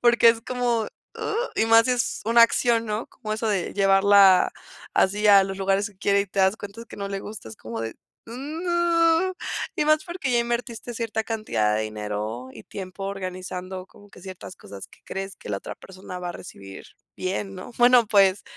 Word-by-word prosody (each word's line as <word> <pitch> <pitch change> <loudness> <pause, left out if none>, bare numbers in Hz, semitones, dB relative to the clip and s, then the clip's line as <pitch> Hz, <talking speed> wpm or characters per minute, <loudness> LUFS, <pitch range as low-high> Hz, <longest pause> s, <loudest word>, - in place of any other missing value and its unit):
porque 235 -1 +6
es 230 0 +3
como, 245 -2 0
¡uh!, - - -7 0.7
y 225 - +2
más 225 0 +6
sí - - +1
es 245 -1 -1
una 230 +1 +6
acción, 230 0 +3
¿no?, 215 +2 -3
como 215 - -6
eso 220 +1 -2
de 195 -5 -1
llevarla 195 -1 +5 0.4
así 205 +2 +2
a 200 -1 +8
los 195 0 -4
lugares 195 +2 0
que 195 - -25
quiere 200 0 +2
y 200 - -2
te 195 - -7
das 190 +3 +3
cuenta 205 +3 -9
que - - -11
no 200 -1 -4
le 195 0 -3
gusta, 210 - -9
es 110 - -11
como 115 0 -7
de, 115 0 -5 0.3
no, 335 +6 +1 0.4
y - - 0
más 310 0 +3
porque 345 -6 -4
ya 240 - +3
invertiste 235 0 -3
cierta 225 -1 -3
cantidad 160 - 0
de 110 - 0
dinero 110 +3 -5
y 110 - -11
tiempo 190 0 -8
organizando 185 -1 -5
como 205 +1 -19
que - - -15
ciertas 185 0 -9
cosas 100 - -11
que - - -21
crees 195 0 -5
que - - -12
la 100 - -1
otra - - -8
persona 185 -1 -10
va 180 - -5
a - - -7
recibir 95 - -11 0.3
bien, 195 +1 -3
¿no?, 185 +5 -9
bueno, 245 -1 +6
pues, 200 -2 +4
200 Hz, 200 wpm, -24 LUFS, 185-235 Hz, 0.7 s, a